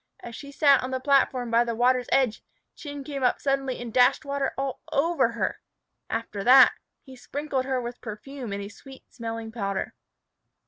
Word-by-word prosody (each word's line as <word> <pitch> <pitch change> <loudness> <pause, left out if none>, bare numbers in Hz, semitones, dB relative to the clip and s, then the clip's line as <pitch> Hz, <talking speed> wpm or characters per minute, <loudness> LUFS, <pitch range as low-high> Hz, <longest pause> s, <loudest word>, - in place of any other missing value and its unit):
As 235 -1 -9
she 280 +2 -9
sat 280 -2 +4
on 255 - -4
the 260 0 -2
platform 260 -3 +2
by 230 +1 +4
the 235 -1 -3
water's 250 +1 +2
edge, 255 -5 +2 0.3
Chin 285 -2 -7
came 280 -1 -5
up 250 - +2
suddenly 275 -2 -1
and 235 -2 -7
dashed 250 +4 +4
water 280 -1 -1
all 270 -1 -3
over 330 +5 +2
her. - - -2 0.5
After 225 -3 -4
that, 260 +3 +8 0.3
he 265 -2 -13
sprinkled 275 +1 -3
her 260 -1 0
with 240 0 -7
perfume 240 +2 -7
and 200 0 -4
a - - -6
sweet 265 +5 -14
smelling 230 -1 -5
powder. 200 -4 -3
255 Hz, 180 wpm, -26 LUFS, 230-275 Hz, 0.5 s, that